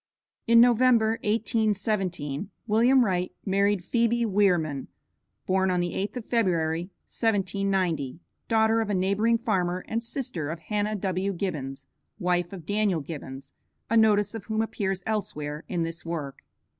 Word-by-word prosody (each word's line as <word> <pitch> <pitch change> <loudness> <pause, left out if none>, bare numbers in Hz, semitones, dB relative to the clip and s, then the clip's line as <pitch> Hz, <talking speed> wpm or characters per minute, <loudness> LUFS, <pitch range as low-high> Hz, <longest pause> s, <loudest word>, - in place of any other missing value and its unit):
In 230 0 +7
November, 235 -2 +4
1817, 210 - 0 0.2
William 240 +4 +4
Wright 180 -2 -1
married 200 -1 +2
Phebe 235 +3 +1
Wierman, 180 -9 +1 0.6
(born 190 0 +2
on 180 -1 +1
the 175 0 -1
8th 205 +6 -3
of 235 - -6
February, 175 -6 0 0.2
1790,) 190 - 0 0.3
daughter 225 0 +3
of 220 - -3
a 205 - +1
neighboring 200 +5 +2
farmer, 185 -6 -1
and 225 +1 -1
sister 230 - -3
of 165 - -3
Hannah 210 +5 -2
W. 190 0 -1
Gibbons, 140 -8 -4 0.3
wife 175 -3 0
of 180 -5 -9
Daniel 205 -3 +1
Gibbons, 140 -2 -8 0.4
a - - +3
notice 210 -2 +4
of 225 -4 -7
whom 220 0 0
appears 195 -4 -2
elsewhere 165 -9 -3
in 175 -3 -1
this 165 +1 -5
work. 155 -5 -5
195 Hz, 140 wpm, -26 LUFS, 175-220 Hz, 0.6 s, In